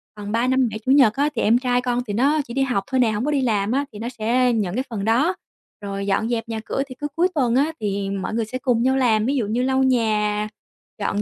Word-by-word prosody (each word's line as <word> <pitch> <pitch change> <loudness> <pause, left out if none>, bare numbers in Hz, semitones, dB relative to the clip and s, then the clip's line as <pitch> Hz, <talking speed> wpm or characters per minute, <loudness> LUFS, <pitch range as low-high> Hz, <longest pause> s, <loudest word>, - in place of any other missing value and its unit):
còn 205 0 -7
Ba, 235 +2 +1
Năm, 260 -2 +2
Bảy, 215 +1 -6
Chủ 260 - +2
nhật 260 -6 +6
á 285 +3 +1
thì - - 0
em 230 +3 +4
trai 250 -1 0
con 245 0 -1
thì 205 - -3
nó 285 +7 +2
chỉ 235 - -8
đi 270 - 0
học 245 -7 0
thôi 260 -1 0
nè, 230 -3 +3
hổng 215 +5 -2
có 300 - 0
đi 280 -2 +1
làm 215 -3 0
á 280 +2 +1
thì 210 - -9
nó 230 - -4
sẽ 245 +1 +1
nhận 205 -3 -1
cái 260 - 0
phần 210 -3 -4
đó, 280 +12 +2 0.5
rồi 200 0 -4
dọn 220 +4 0
dẹp 230 -1 -2
nhà 220 -1 -3
cửa 270 - -2
thì 255 - -10
cứ 295 - -2
cuối 350 +2 +3
tuần 245 -4 +1
á 290 +4 +2
thì 200 -2 -2
mọi 195 +2 -3
người 225 -1 0
sẽ 255 +4 -5
cùng 245 -3 +1
nhau 265 +1 +2
làm 220 -4 +2
ví 275 +3 0
dụ 235 -6 0
như 235 +4 0
lau 265 0 +2
nhà, 215 -4 +1 0.5
dọn 205 0 -1
235 Hz, 285 wpm, -22 LUFS, 215-260 Hz, 0.5 s, nhật